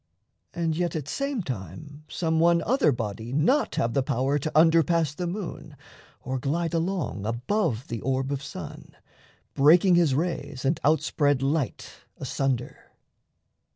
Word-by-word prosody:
And 165 Hz, -2 st, 0 dB
yet, 175 Hz, -1 st, -1 dB
at 150 Hz, -3 st, -4 dB
same 275 Hz, -, -2 dB
time, 140 Hz, -, -7 dB
some 160 Hz, -1 st, -1 dB
one 170 Hz, 0 st, +4 dB
other 240 Hz, -, +3 dB
body 110 Hz, -1 st, -4 dB
Not 170 Hz, -, +2 dB
have 115 Hz, 0 st, 0 dB
the 135 Hz, -, +2 dB
power 130 Hz, +3 st, 0 dB
to 155 Hz, +3 st, -3 dB
under 165 Hz, +1 st, +6 dB
pass 165 Hz, -2 st, +1 dB
the 175 Hz, +3 st, -4 dB
moon, 185 Hz, 0 st, -6 dB, 0.5 s
Or 130 Hz, +1 st, -3 dB
glide 165 Hz, +5 st, -1 dB
along 165 Hz, -, -2 dB
above 125 Hz, -, -1 dB
the 115 Hz, -2 st, -5 dB
orb 135 Hz, +1 st, -1 dB
of 140 Hz, -1 st, -2 dB
sun, 140 Hz, 0 st, -9 dB, 0.6 s
Breaking 170 Hz, +6 st, +5 dB
his 170 Hz, -6 st, +4 dB
rays 145 Hz, -4 st, -3 dB
and 145 Hz, +4 st, +1 dB
outspread 145 Hz, -2 st, +2 dB
light 140 Hz, -2 st, -1 dB, 0.3 s
asunder? 135 Hz, -2 st, -3 dB
150 Hz, 145 wpm, -26 LUFS, 130-170 Hz, 0.6 s, under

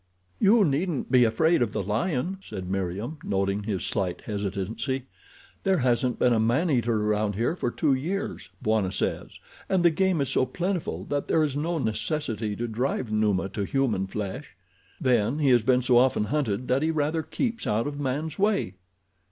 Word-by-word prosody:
"You 205 Hz, +1 st, +5 dB
needn't 150 Hz, -1 st, -1 dB
be 125 Hz, -2 st, +6 dB
afraid 160 Hz, +8 st, +3 dB
of 115 Hz, -4 st, 0 dB
the -, -, -1 dB
lion," 140 Hz, -, -1 dB
said 95 Hz, -4 st, -7 dB
Meriem, 95 Hz, -, -3 dB
noting 100 Hz, +1 st, 0 dB
his 100 Hz, -4 st, -2 dB
slight 95 Hz, -4 st, -2 dB
hesitancy. 105 Hz, +6 st, -3 dB, 0.6 s
"There 190 Hz, -1 st, +2 dB
hasn't 125 Hz, -2 st, +1 dB
been 125 Hz, -, +3 dB
a 115 Hz, -, +2 dB
man 125 Hz, +10 st, +2 dB
eater 120 Hz, -4 st, +1 dB
around 105 Hz, -1 st, 0 dB
here 120 Hz, -, 0 dB
for 125 Hz, -, -1 dB
two 145 Hz, +3 st, +1 dB
years, 165 Hz, -, -3 dB
Bwana 110 Hz, -4 st, +1 dB
says, 95 Hz, -, -3 dB, 0.3 s
and 185 Hz, -2 st, +2 dB
the 170 Hz, -, +7 dB
game 185 Hz, +1 st, +1 dB
is 140 Hz, -, 0 dB
so 130 Hz, -, +1 dB
plentiful 180 Hz, -1 st, -2 dB
that 145 Hz, -1 st, -1 dB
there 160 Hz, -, +3 dB
is 145 Hz, -3 st, -1 dB
no 165 Hz, +4 st, -1 dB
necessity 110 Hz, -3 st, -2 dB
to 120 Hz, +3 st, -3 dB
drive 120 Hz, 0 st, -2 dB
Numa 105 Hz, -3 st, +1 dB
to 100 Hz, +1 st, -3 dB
human 115 Hz, -5 st, 0 dB
flesh. 105 Hz, +5 st, -5 dB, 0.4 s
Then, 120 Hz, 0 st, +2 dB
he 145 Hz, -3 st, +2 dB
has 120 Hz, -2 st, +5 dB
been 125 Hz, +2 st, +2 dB
so 125 Hz, -1 st, +5 dB
often 130 Hz, -4 st, +3 dB
hunted 120 Hz, -1 st, -1 dB
that 130 Hz, +2 st, +2 dB
he 160 Hz, -, +1 dB
rather 155 Hz, +1 st, 0 dB
keeps 230 Hz, -, -3 dB
out 110 Hz, +2 st, +1 dB
of 145 Hz, 0 st, -4 dB
man's 145 Hz, +4 st, -2 dB
way." 195 Hz, -, +1 dB
125 Hz, 180 wpm, -26 LUFS, 105-155 Hz, 0.6 s, the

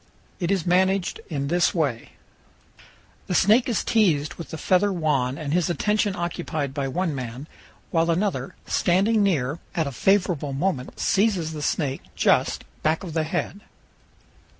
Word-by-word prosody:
It 175 Hz, -3 st, -1 dB
is 190 Hz, -4 st, 0 dB
managed 190 Hz, +1 st, +2 dB
in 140 Hz, -4 st, -2 dB
this 175 Hz, +4 st, +2 dB
way: 140 Hz, -9 st, -1 dB, 1.1 s
The 180 Hz, -, -1 dB
snake 225 Hz, +8 st, +4 dB
is 230 Hz, -, 0 dB
teased 165 Hz, -10 st, +2 dB
with 170 Hz, -, -9 dB
the 160 Hz, -, -6 dB
feather 185 Hz, +5 st, +2 dB
wand 145 Hz, -7 st, 0 dB
and 150 Hz, -2 st, -3 dB
his 175 Hz, -1 st, +2 dB
attention 210 Hz, +2 st, +1 dB
occupied 165 Hz, -5 st, -3 dB
by 140 Hz, -1 st, -2 dB
one 170 Hz, +4 st, -1 dB
man, 130 Hz, +2 st, -6 dB, 0.4 s
while 165 Hz, 0 st, +2 dB
another, 185 Hz, +4 st, -1 dB
standing 200 Hz, +5 st, +2 dB
near, 155 Hz, -6 st, +1 dB, 0.2 s
at 165 Hz, -3 st, +1 dB
a 140 Hz, -, -3 dB
favorable 180 Hz, -2 st, +1 dB
moment 140 Hz, -3 st, -2 dB
seizes 190 Hz, -6 st, +1 dB
the 150 Hz, -, -5 dB
snake 140 Hz, -2 st, -1 dB
just, -, -, +2 dB, 0.2 s
back 155 Hz, +3 st, +1 dB
of 170 Hz, -4 st, -6 dB
the 160 Hz, -1 st, 0 dB
head. 180 Hz, +5 st, -3 dB
170 Hz, 150 wpm, -24 LUFS, 145-190 Hz, 1.1 s, snake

